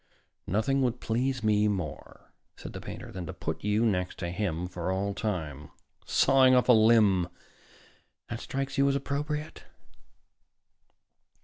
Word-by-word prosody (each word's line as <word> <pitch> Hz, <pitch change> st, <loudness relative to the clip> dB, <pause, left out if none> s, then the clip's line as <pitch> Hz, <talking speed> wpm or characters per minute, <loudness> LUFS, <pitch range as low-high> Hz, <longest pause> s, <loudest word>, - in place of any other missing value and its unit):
"Nothing 110 Hz, +8 st, +1 dB
would 125 Hz, -1 st, 0 dB
please 125 Hz, +2 st, -1 dB
me 105 Hz, -1 st, +3 dB
more," 95 Hz, -8 st, -5 dB, 0.2 s
said -, -, -9 dB
the -, -, -7 dB
painter, -, -, -8 dB
"than 90 Hz, -3 st, -6 dB
to -, -, -5 dB
put 80 Hz, +1 st, -5 dB
you 105 Hz, +3 st, +2 dB
next 90 Hz, -4 st, -1 dB
to 85 Hz, -2 st, -4 dB
him 90 Hz, -3 st, -2 dB
for 90 Hz, 0 st, -4 dB
all 100 Hz, +2 st, -1 dB
time. 80 Hz, -9 st, -4 dB, 0.4 s
Sawing 130 Hz, -1 st, +5 dB
off 125 Hz, -, +3 dB
a 125 Hz, -, +7 dB
limb 110 Hz, -5 st, +4 dB, 1.0 s
that 115 Hz, -, -5 dB
strikes 135 Hz, 0 st, -3 dB
you 140 Hz, 0 st, +4 dB
as 140 Hz, -, +1 dB
appropriate?" 150 Hz, +2 st, -3 dB
105 Hz, 140 wpm, -28 LUFS, 90-130 Hz, 1.0 s, a